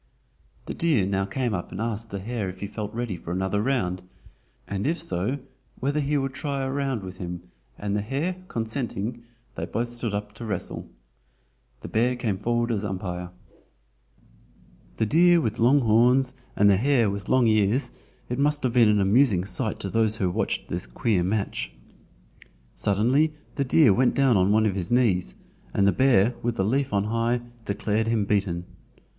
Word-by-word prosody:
The -, -, -4 dB
deer 150 Hz, -, +2 dB
now 95 Hz, 0 st, 0 dB
came 120 Hz, +3 st, -2 dB
up 90 Hz, -3 st, -4 dB
and -, -, -6 dB
asked 115 Hz, 0 st, -3 dB
the 100 Hz, -, -4 dB
hare 105 Hz, 0 st, -3 dB
if 90 Hz, 0 st, -9 dB
he -, -, -2 dB
felt 105 Hz, +1 st, -5 dB
ready 120 Hz, -4 st, -3 dB
for 85 Hz, 0 st, -8 dB
another 95 Hz, +3 st, 0 dB
round, 95 Hz, -8 st, 0 dB, 0.7 s
and 100 Hz, +4 st, -2 dB
if 165 Hz, +3 st, +1 dB
so 95 Hz, -, -2 dB, 0.4 s
whether 140 Hz, +3 st, 0 dB
he 145 Hz, 0 st, +1 dB
would 135 Hz, -1 st, -2 dB
try 140 Hz, 0 st, -2 dB
a 130 Hz, -, -2 dB
round 135 Hz, -6 st, -1 dB
with 95 Hz, 0 st, -8 dB
him, 90 Hz, -1 st, -5 dB, 0.3 s
and 100 Hz, 0 st, -2 dB
the 105 Hz, -, 0 dB
hare 145 Hz, -, -2 dB
consenting, 115 Hz, -, -3 dB, 0.3 s
they -, -, -4 dB
both 120 Hz, +1 st, -2 dB
stood 120 Hz, -3 st, -3 dB
up 105 Hz, 0 st, -4 dB
to 115 Hz, +2 st, -8 dB
wrestle. 100 Hz, -5 st, -4 dB, 0.9 s
The -, -, -7 dB
bear 120 Hz, +3 st, +1 dB
came 110 Hz, -6 st, -2 dB
forward 120 Hz, +2 st, 0 dB
as 105 Hz, -2 st, -1 dB
umpire. 90 Hz, -3 st, -4 dB, 1.7 s
The 110 Hz, -, +2 dB
deer 175 Hz, +8 st, +5 dB
with 115 Hz, -6 st, -2 dB
long 130 Hz, +5 st, +5 dB
horns 125 Hz, +3 st, +4 dB, 0.2 s
and 105 Hz, -, +4 dB
the 100 Hz, -2 st, +5 dB
hare 125 Hz, 0 st, +3 dB
with 100 Hz, -1 st, -6 dB
long 130 Hz, -2 st, +4 dB
ears, 110 Hz, +4 st, +2 dB, 0.4 s
it 125 Hz, +2 st, -3 dB
must 145 Hz, 0 st, +1 dB
have 125 Hz, -2 st, 0 dB
been 120 Hz, -3 st, +5 dB
an 105 Hz, -1 st, +3 dB
amusing 100 Hz, -2 st, +3 dB
sight 100 Hz, +3 st, -2 dB
to 100 Hz, -, -3 dB
those 110 Hz, -1 st, +2 dB
who 95 Hz, -4 st, 0 dB
watched -, -, -2 dB
this -, -, -4 dB
queer 90 Hz, -, 0 dB
match. 100 Hz, +3 st, -2 dB, 1.0 s
Suddenly 130 Hz, +10 st, +2 dB, 0.2 s
the 140 Hz, -, 0 dB
deer 130 Hz, -3 st, +5 dB
went 125 Hz, +4 st, +2 dB
down 135 Hz, -4 st, +4 dB
on 95 Hz, +1 st, +3 dB
one 110 Hz, +1 st, +4 dB
of 105 Hz, -, +1 dB
his 90 Hz, -3 st, -3 dB
knees, 95 Hz, -, +2 dB, 0.4 s
and 100 Hz, -, +3 dB
the 100 Hz, -, +5 dB
bear 125 Hz, -3 st, +4 dB
with 120 Hz, -1 st, -1 dB
the 95 Hz, -, 0 dB
leaf 135 Hz, +5 st, 0 dB
on 100 Hz, -1 st, +1 dB
high 115 Hz, +3 st, 0 dB, 0.2 s
declared 105 Hz, +2 st, -1 dB
him 115 Hz, -3 st, +1 dB
beaten. 95 Hz, -4 st, 0 dB
110 Hz, 185 wpm, -25 LUFS, 100-125 Hz, 1.7 s, deer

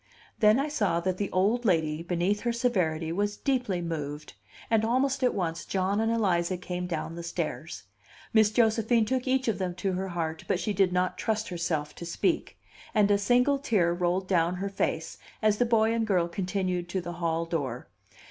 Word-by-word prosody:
Then 215 Hz, +3 st, +5 dB
I 280 Hz, -, 0 dB
saw 205 Hz, -, 0 dB
that 185 Hz, +1 st, -1 dB
the 200 Hz, 0 st, -2 dB
old 210 Hz, +7 st, +1 dB
lady, 160 Hz, -6 st, +1 dB
beneath 175 Hz, +4 st, 0 dB
her 240 Hz, +2 st, -1 dB
severity, 180 Hz, -10 st, 0 dB
was 205 Hz, +3 st, -1 dB
deeply 245 Hz, -10 st, -1 dB
moved; 150 Hz, -2 st, -5 dB, 0.3 s
and 225 Hz, -1 st, +2 dB
almost 260 Hz, +4 st, +1 dB
at 250 Hz, -, +2 dB
once 165 Hz, -4 st, -2 dB
John 195 Hz, +2 st, 0 dB
and 225 Hz, +1 st, +1 dB
Eliza 185 Hz, -5 st, +1 dB
came 180 Hz, 0 st, -4 dB
down 165 Hz, -1 st, -3 dB
the 170 Hz, -, -6 dB
stairs. 170 Hz, -3 st, -4 dB, 0.5 s
Miss 220 Hz, -2 st, +5 dB
Josephine 225 Hz, 0 st, +3 dB
took 255 Hz, +2 st, -1 dB
each 260 Hz, 0 st, +1 dB
of 225 Hz, -, 0 dB
them 180 Hz, -2 st, -2 dB
to 190 Hz, +1 st, -1 dB
her 190 Hz, +1 st, -2 dB
heart, 165 Hz, -3 st, -3 dB
but -, -, +1 dB
she 210 Hz, -, -1 dB
did 195 Hz, -1 st, +3 dB
not 180 Hz, 0 st, 0 dB
trust 220 Hz, -1 st, -1 dB
herself 160 Hz, -4 st, -2 dB
to 170 Hz, -, -8 dB
speak; 330 Hz, -, -1 dB, 0.4 s
and 205 Hz, -1 st, +4 dB
a 200 Hz, -, +4 dB
single 250 Hz, +6 st, +3 dB
tear 200 Hz, -, +2 dB
rolled 180 Hz, +2 st, 0 dB
down 175 Hz, -1 st, +2 dB
her 195 Hz, +2 st, -3 dB
face, 195 Hz, -, -2 dB, 0.2 s
as 215 Hz, -1 st, +2 dB
the 245 Hz, -, +4 dB
boy 225 Hz, -1 st, +3 dB
and 230 Hz, -1 st, 0 dB
girl 180 Hz, -5 st, +2 dB
continued 180 Hz, -1 st, -2 dB
to 190 Hz, -, -1 dB
the 175 Hz, 0 st, -6 dB
hall 165 Hz, 0 st, 0 dB
door. 140 Hz, -7 st, -3 dB
190 Hz, 195 wpm, -28 LUFS, 170-220 Hz, 0.5 s, Then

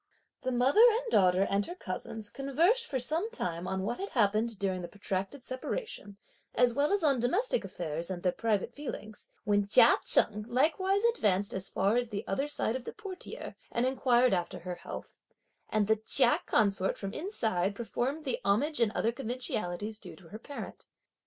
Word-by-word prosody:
The 255 Hz, -, -2 dB
mother 255 Hz, -, +4 dB
and 465 Hz, +1 st, -1 dB
daughter 185 Hz, 0 st, +4 dB
and 200 Hz, +1 st, +1 dB
her 350 Hz, -, -6 dB
cousins 220 Hz, -, -6 dB
conversed 335 Hz, -, +1 dB
for 265 Hz, -, -2 dB
some 320 Hz, -, +1 dB
time 175 Hz, -, -3 dB
on 190 Hz, 0 st, -2 dB
what 235 Hz, +5 st, -3 dB
had 395 Hz, -, -4 dB
happened 215 Hz, 0 st, +1 dB
during 190 Hz, -2 st, -1 dB
the 175 Hz, -, -5 dB
protracted 200 Hz, +6 st, -4 dB
separation, 255 Hz, -, -5 dB, 0.4 s
as 245 Hz, 0 st, +4 dB
well 285 Hz, +4 st, +1 dB
as 405 Hz, -3 st, +2 dB
on 280 Hz, -5 st, +3 dB
domestic 410 Hz, -, +1 dB
affairs 165 Hz, 0 st, -4 dB
and 180 Hz, -2 st, -5 dB
their 180 Hz, -, +3 dB
private 225 Hz, +2 st, -1 dB
feelings, 220 Hz, -7 st, -8 dB, 0.2 s
when 205 Hz, -1 st, +1 dB
Chia 230 Hz, +3 st, +7 dB
Cheng 210 Hz, 0 st, +2 dB
likewise 375 Hz, -, +1 dB
advanced 205 Hz, -, +2 dB
as 190 Hz, 0 st, -2 dB
far 205 Hz, +4 st, +1 dB
as 245 Hz, -1 st, -1 dB
the 200 Hz, -2 st, -4 dB
other 270 Hz, +9 st, -1 dB
side 270 Hz, -5 st, 0 dB
of 255 Hz, -1 st, -5 dB
the -, -, -6 dB
portiere, 395 Hz, -4 st, -7 dB, 0.2 s
and 235 Hz, +1 st, 0 dB
inquired 255 Hz, -2 st, +3 dB
after 175 Hz, -2 st, -1 dB
her 180 Hz, +1 st, -5 dB
health, 175 Hz, -, -8 dB, 0.6 s
and 215 Hz, -1 st, +1 dB
the 220 Hz, +2 st, +2 dB
Chia 220 Hz, -, +4 dB
consort 195 Hz, -3 st, +2 dB
from 195 Hz, -1 st, -5 dB
inside 220 Hz, -, -1 dB
performed 245 Hz, +7 st, -3 dB
the 260 Hz, -, -1 dB
homage 240 Hz, +11 st, +1 dB
and 230 Hz, -3 st, +3 dB
other 230 Hz, -, +1 dB
conventionalities 220 Hz, -5 st, -4 dB
(due -, -, -10 dB
to 175 Hz, -4 st, -16 dB
her 215 Hz, -, -8 dB
parent). 285 Hz, +4 st, -8 dB
230 Hz, 180 wpm, -30 LUFS, 200-280 Hz, 0.6 s, Chia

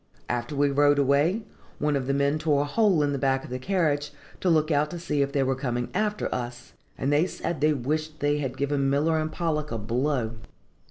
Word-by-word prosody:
After 120 Hz, +3 st, -2 dB
we 140 Hz, 0 st, +2 dB
rode 145 Hz, +1 st, +4 dB
away, 145 Hz, -, +2 dB, 0.3 s
one 150 Hz, 0 st, 0 dB
of 130 Hz, -2 st, -2 dB
the 140 Hz, -, +1 dB
men 140 Hz, +2 st, +1 dB
tore 150 Hz, -2 st, +2 dB
a -, -, -3 dB
hole 190 Hz, -1 st, +3 dB
in 145 Hz, -, +1 dB
the 140 Hz, -, -2 dB
back 135 Hz, -1 st, +1 dB
of -, -, -10 dB
the 125 Hz, -, -3 dB
carriage, 150 Hz, -3 st, 0 dB, 0.3 s
to 185 Hz, -, +1 dB
look 155 Hz, -1 st, +3 dB
out 150 Hz, 0 st, +2 dB
to 175 Hz, -, -6 dB
see 150 Hz, -4 st, -1 dB
if 140 Hz, 0 st, 0 dB
they 140 Hz, -1 st, +1 dB
were 135 Hz, 0 st, +1 dB
coming 120 Hz, -2 st, -2 dB
after 210 Hz, +1 st, 0 dB
us, 120 Hz, 0 st, -6 dB, 0.2 s
and 140 Hz, +2 st, 0 dB
they 155 Hz, +5 st, +3 dB
said 170 Hz, -5 st, -4 dB
they 155 Hz, +1 st, +4 dB
wished 155 Hz, +4 st, -2 dB
they 145 Hz, 0 st, +1 dB
had 135 Hz, -2 st, -3 dB
given 140 Hz, -1 st, 0 dB
Miller 155 Hz, +3 st, +2 dB
and 155 Hz, 0 st, -2 dB
Pollock 155 Hz, -3 st, -2 dB
a 115 Hz, -, -1 dB
blow. 120 Hz, +1 st, -1 dB
145 Hz, 225 wpm, -26 LUFS, 135-155 Hz, 0.3 s, rode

